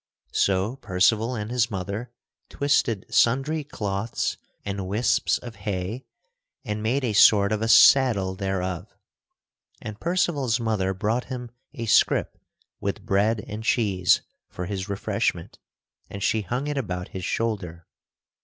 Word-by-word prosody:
So 100 +6 +1
Percival 110 +3 +1
and 105 0 -4
his 120 -1 +1
mother 100 +4 -5 0.4
twisted 130 -7 +1
sundry 135 +6 +2
cloths 105 -5 -3 0.3
and 100 -2 -3
wisps 105 +6 +1
of 120 -2 -10
hay 100 +5 -4 0.6
and 105 -2 -3
made 125 +6 0
a 115 -4 0
sort 100 -1 +6
of 110 0 0
a 115 - 0
saddle 115 -6 +6
thereof. 95 -2 -3 0.8
And 105 0 -8
Percival's 150 -9 0
mother 105 -5 -1
brought 110 +6 -1
him 125 -2 -6 0.2
a 115 - -4
scrip 110 - +2 0.4
with - - -4
bread 105 +2 +1
and 105 +2 -6
cheese 100 -7 +2 0.3
for 90 - -6
his 95 +1 -4
refreshment 100 -1 -2 0.5
and 100 -1 -6
she 110 - +1
hung 125 +7 -3
it 145 -1 -2
about 90 -7 -4
his 95 - -7
shoulder. 90 -7 -3
110 Hz, 135 wpm, -25 LUFS, 95-120 Hz, 0.8 s, sort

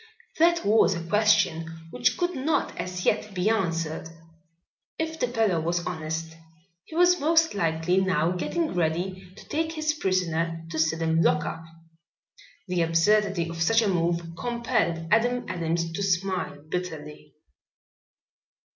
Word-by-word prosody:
That 340 -5 +4
was 205 -2 +4
a 170 0 -6
question 200 -4 +2 0.2
which 245 -1 +1
could 350 0 0
not 280 +4 0
as 180 0 -5
yet 215 -2 0
be 185 +4 +2
answered. 165 -6 -2 0.9
If 320 0 -3
the 250 - +1
fellow 220 -8 +1
was 170 +1 -1
honest 160 -1 -4 0.5
he 315 - -11
was 355 +1 +5
most 325 +2 +3
likely 165 -1 0
now 175 -3 +1
getting 305 - -2
ready 180 +2 -2
to - - -14
take 320 +1 -1
his 310 -1 0
prisoner 165 - -1
to 160 - -3
the - - +6
Sidham 160 0 +1
lockup. 155 +1 +1 1.0
The 180 -1 0
absurdity 170 +2 +2
of 165 0 -6
such 225 +7 +4
a - - +1
move 170 -2 +1
compelled 180 -7 -1
Adam 245 +2 +2
Adams 165 -1 -2
to 165 - -4
smile 185 -5 -1
bitterly. 150 -4 -6
180 Hz, 140 wpm, -26 LUFS, 165-225 Hz, 1.0 s, the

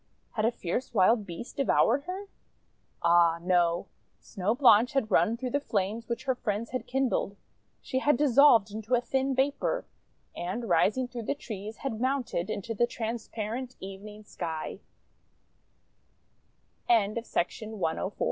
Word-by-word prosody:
Had 215 -1 -1
a 230 - +3
fierce 235 +3 -4
wild 210 +2 +4
beast 175 +8 -8
devoured 275 -1 +3
her? 375 +3 -5 0.8
Ah, 170 -1 +5
no! 175 0 +2 0.3
Snow 205 +2 -2
Blanche 245 -3 +5
had 250 -6 0
run 205 +7 +3
through 250 0 -4
the 285 - +1
flames 220 -3 -2 0.2
her 265 -2 +1
friends 220 -2 -3
had 255 - -4
kindled. 255 -6 0 0.5
She 260 - -1
had 295 0 +3
dissolved 260 -6 +5
into 220 +3 -1
a 240 - +1
thin 265 +2 0
vapour, 285 - 0 0.5
and, 195 +7 -4
rising 250 +6 +2
through 240 -2 -7
the - - +1
trees, 215 -4 -7
had 230 -5 -4
mounted 255 -9 -1
into 215 +3 -3
the 240 +2 +2
transparent 230 +1 -4
even 210 +2 -9
230 Hz, 125 wpm, -29 LUFS, 205-260 Hz, 0.8 s, Ah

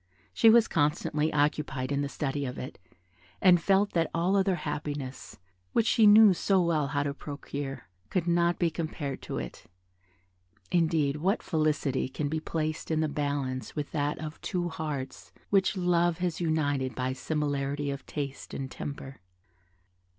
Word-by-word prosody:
She 225 - +6
was 230 0 +6
constantly 150 +1 +1
occupied 145 -3 0
in 140 0 +1
the 140 - -2
study 145 -1 -2
of 125 -1 -4
it, 130 - -7 0.6
and 180 -3 +6
felt 195 +3 +3
that 165 -2 +1
all 175 +4 +2
other 195 -1 +3
happiness, 145 -4 -5 0.4
which 230 - +3
she 225 -2 +5
knew 210 -1 +8
so 190 +2 +2
well 165 -5 +1
how 145 0 0
to 140 -1 -2
procure, 140 -3 -6 0.2
could 180 -3 0
not 170 0 +2
be 170 -2 +1
compared 155 -4 -4
to - - -5
it; - - -7 1.1
indeed, 160 -4 +2
what 190 +8 0
felicity 150 -5 0
can 145 +2 -3
be 160 +1 -1
placed 155 0 -3
in 160 -1 +1
the 155 - +1
balance 140 -3 -3
with 150 -2 -4
that 145 -1 -1
of 155 -1 -7
two 175 -1 -2
hearts 150 -5 -5 0.2
which 195 0 +3
love 175 -2 +2
has 180 -1 -2
united 145 -6 0
by 130 0 -1
similarity 145 0 -2
of 140 0 -6
taste 140 -2 -5
and 135 -1 -5
temper? 140 -3 -7
150 Hz, 160 wpm, -29 LUFS, 140-170 Hz, 1.1 s, knew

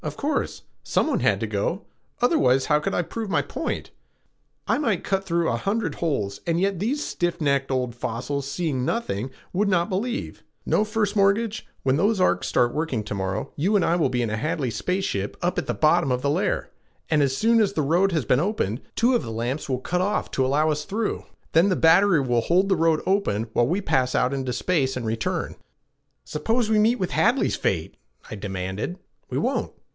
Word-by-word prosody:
"Of - - -5
course. 295 0 -2 0.2
Someone - - 0
has - - +2
to - - 0
go; - - -2 0.4
otherwise, 135 - +3
how 150 -1 +3
could 150 - -2
I 175 - +1
prove 220 +4 -5
my - - +1
point? - - -4 0.8
I - - +2
might 225 - 0
cut 195 -1 -1
through 170 -2 +1
a 115 - 0
hundred 205 - -1
holes 105 -12 -2
and 170 0 +1
yet 195 -1 0
these 265 +9 -1
stiff 175 0 -2
necked 140 -3 +1
old 125 -2 -1
fossils, 135 +4 -3
seeing 145 -4 -1
nothing, 130 - -2 0.2
would 200 +3 +1
not 175 0 +2
believe. 230 +6 -3 0.2
No, - - +2
First 215 -1 -1
Mortgage, 205 +2 +1 0.2
when 135 0 +2
those 205 +4 +2
arcs 90 - +2
start 120 -1 +2
working 150 -8 -1
to 105 - -5
morrow, 95 +1 -3
you 190 +9 +1
and 200 - +3
I 170 - +2
will 165 -6 +2
be 125 -1 0
in 110 - -2
a 110 - -1
Hadley 140 -1 -1
space 180 - -1
ship 100 0 -3
up 175 +1 0
at - - -5
the - - 0
bottom 155 -2 +3
of 125 +1 -1
the 140 - +2
layer, 185 +7 -1 0.4
and 155 -2 +2
as 135 -1 +1
soon 230 +1 +4
as 200 -2 +1
the 155 - 0
road 175 +7 +2
has 155 -8 0
been 125 - +3
opened, 150 - -1
two 240 +3 +3
of 240 - +2
the 115 - -6
lamps 120 +7 -3
will 130 -1 0
cut 180 +6 -1
off 205 +3 -1
to 135 - +1
allow 150 +4 +2
us 150 0 -2
through. 210 +5 -3 0.3
Then 170 +5 +4
the 185 - +2
battery 170 0 +5
will 120 -3 +1
hold 185 - +2
the 190 - +4
road 165 -1 +2
open 125 - 0
while 120 - +3
we 185 +7 0
pass 130 -9 +1
out 125 +2 +2
into 130 -2 -2
space 135 -3 0
and 120 - -4
return." 110 0 -2 0.7
"Suppose 225 +9 -1
we 215 - +4
meet 225 +4 +3
with 185 -5 -2
Hadley's 245 +4 +2
fate?" 80 -4 -2 0.3
I - - -4
demanded. 95 - -4 0.3
"We - - -3
won't. - - -1
160 Hz, 210 wpm, -24 LUFS, 125-200 Hz, 0.8 s, battery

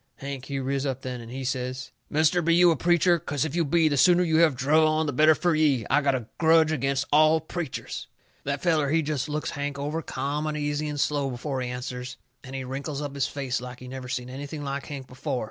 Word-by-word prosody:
Hank, 135 -1 -6
he 140 0 -4
riz 135 0 -1
up 135 -2 -3
then, 125 -2 -5
and 115 0 -10
he 135 +1 -5
says: 130 0 -3 0.2
"Mister, 155 +3 +3
be 170 0 +3
you 175 0 +6
a - - +2
preacher? 175 +2 +3
'Cause 145 -2 -2
if 160 0 -4
you 170 - +2
be, 160 +2 +3
the 145 -2 +1
sooner 180 +4 +5
you 160 -2 +2
have 160 -4 +5
druv 145 +5 +3
on, 155 0 +1
the 145 - -2
better 155 +4 +5
fur 175 +2 +1
ye. 145 -7 +2
I 145 - +4
got 140 -2 +2
a 125 -3 -3
grudge 160 -1 +5
agin 135 -2 0 0.2
all 155 +1 +6
preachers." 160 -2 -5 0.4
That 140 0 -3
feller, 155 -5 +2
he 160 +2 +2
jest 150 -1 -2
looks 150 +1 -2
Hank 145 0 -4
over 150 +3 -2
ca'am 145 +2 -3
and 150 0 -2
easy 145 0 -1
and 145 -1 -4
slow 140 -1 +1
before 130 +1 -3
he 125 - -3
answers, 125 0 -6 0.3
and 130 0 -8
he 135 - -3
wrinkles 135 +3 -4
up 145 -1 -4
his 140 -1 0
face 135 -3 -3
like 125 0 -8
he 130 - -10
never 130 0 -7
seen 125 -1 -3
anything 145 +3 -6
like 140 0 -4
Hank 140 -3 -6
before. 130 +1 -4
145 Hz, 245 wpm, -26 LUFS, 130-155 Hz, 0.4 s, you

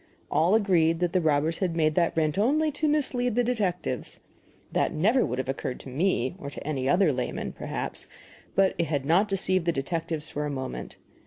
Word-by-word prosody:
All 170 +7 +3
agreed 170 -6 +3
that 175 -1 0
the 185 - +3
robbers 155 +1 +1
had 180 -4 -1
made 155 -2 +2
that 170 0 +1
rent 155 -2 +2
only 300 +8 +2
to 305 +2 -1
mislead 255 -6 +1
the 245 - +3
detectives. 190 - -2 0.5
That - - +1
never 220 +11 +3
would 125 - -2
have 130 - -2
occurred 130 -1 -3
to - - -10
me 135 -2 0
or 140 - -6
to 145 - -9
any 135 -3 -1
other 175 -2 +4
layman, 125 0 -3
perhaps, - - -5 0.5
but 195 -1 +4
it 170 - +2
had 145 -3 -2
not 185 +8 +3
deceived 185 -2 0
the - - +4
detectives 160 +1 -3
for 150 - -4
a - - -3
moment. 130 -2 -5
165 Hz, 195 wpm, -27 LUFS, 145-195 Hz, 0.5 s, other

